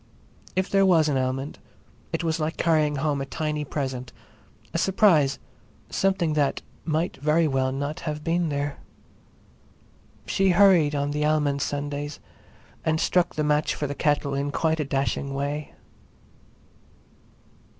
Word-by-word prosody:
If 185 +1 +1
there 195 0 +3
was 170 -5 +4
an 140 - +1
almond 130 +2 -3 0.5
it 165 +1 -2
was 165 0 0
like 155 +1 -2
carrying 155 -3 +2
home 145 0 0
a - - -2
tiny 150 +1 -2
present—a 130 -4 -7
surprise—something 180 0 +1
that 145 -2 0 0.2
might 160 +2 -1
very 155 +3 +2
well 135 -2 +1
not 140 +3 -3
have 150 -1 -4
been 170 0 +1
there. 145 0 -3 1.5
She 195 0 +2
hurried 175 -7 +5
on 145 0 -1
the 150 +1 -1
almond 150 -2 +1
Sundays 145 +1 -3 0.6
and 160 0 +1
struck 180 +1 +1
the 155 - 0
match 150 0 +1
for 150 - -3
the 145 - -3
kettle 145 0 0
in 140 +1 -1
quite 160 +2 0
a 150 - 0
dashing 135 0 -1
way. 145 +2 -3
150 Hz, 135 wpm, -25 LUFS, 140-160 Hz, 1.5 s, hurried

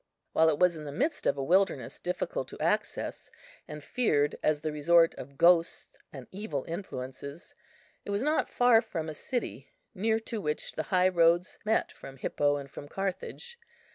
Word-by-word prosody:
While 160 0 +5
it 150 - +1
was 180 0 +4
in 155 -1 -8
the 145 - -5
midst 290 - -1
of 140 - +2
a 135 - -2
wilderness 170 -6 +1
difficult 180 - -3
of - - -9
access, - - -1 0.4
and 150 -1 -8
feared 145 -13 +1
as 150 -1 +1
the 155 0 -2
resort 165 +3 +4
of 140 +2 -10
ghosts 170 0 +4 0.2
and 135 -3 -9
evil 210 +4 -4
influences, 140 -4 -7 0.5
it - - -9
was 200 +3 0
not 305 +2 +1
far 245 -2 +5
from 160 -8 -4
a - - -5
city 245 - -4 0.2
near 220 +2 +1
to 225 -1 -5
which 150 -3 -2
the - - -3
high 185 0 +4
roads 170 0 +3
met 220 +1 +1
from 135 0 -11
Hippo 145 +2 +1
and 140 -1 -8
from 145 - -9
Carthage. 195 - -5
170 Hz, 175 wpm, -29 LUFS, 145-200 Hz, 0.5 s, While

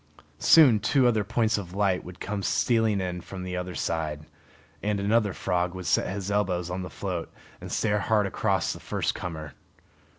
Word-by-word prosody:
Soon 135 -10 +7
two 130 +5 +2
other 110 -4 +3
points 110 0 +1
of 90 -2 -8
light 100 -3 +1
would 90 0 -11
come 105 -1 -3
stealing 110 0 +2
in 90 -1 -3
from 95 0 -8
the 90 0 -4
other 90 0 -4
side, 75 -2 -2 0.6
and 105 -1 0
another 105 +1 +2
frog 90 -1 -1
would 90 -1 -6
set - - +1
his 100 0 -4
elbows 90 -4 0
on 95 +1 -3
the 90 - -6
float 90 -1 -4 0.3
and - - -8
stare 105 -1 +1
hard 105 0 +2
across 95 - 0
at - - -11
the - - -19
first - - 0
comer. 80 -4 -6
95 Hz, 190 wpm, -27 LUFS, 90-105 Hz, 0.6 s, Soon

